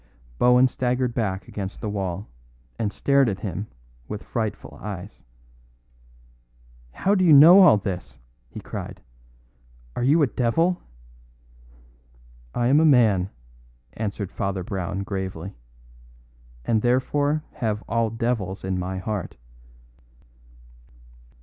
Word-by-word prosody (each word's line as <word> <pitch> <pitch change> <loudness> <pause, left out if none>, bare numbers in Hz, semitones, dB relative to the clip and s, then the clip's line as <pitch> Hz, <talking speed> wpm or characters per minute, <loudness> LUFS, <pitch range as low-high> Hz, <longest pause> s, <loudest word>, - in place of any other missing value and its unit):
Bohun 125 +1 +5
staggered 125 -1 -1
back 95 -5 -2
against 100 -1 -6
the 110 - -5
wall, 95 -1 -4 0.5
and 105 -3 -1
stared 140 0 +2
at 100 -1 -4
him 100 +1 -4 0.4
with 105 - -6
frightful 110 -3 -4
eyes. 100 -1 -8 1.7
"How 195 - 0
do 190 -2 +2
you 170 - +5
know 160 +7 +9
all 180 - +7
this?" 95 -7 -5 0.3
he - - -8
cried. - - -7 1.0
"Are - - -3
you 145 +6 +4
a - - +6
devil?" 140 - 0 1.7
"I 120 - 0
am 135 +5 +5
a - - +4
man," 110 - +4 0.6
answered 100 -3 -4
Father 95 -1 -3
Brown 95 +1 -4
gravely; 95 -2 -5 1.1
"and 110 -2 +1
therefore 145 +5 +1
have 110 -2 -3
all 115 -1 +1
devils 115 -5 -2
in 95 -1 -2
my 95 +1 -3
heart. 100 -1 -4
110 Hz, 115 wpm, -24 LUFS, 95-125 Hz, 1.7 s, know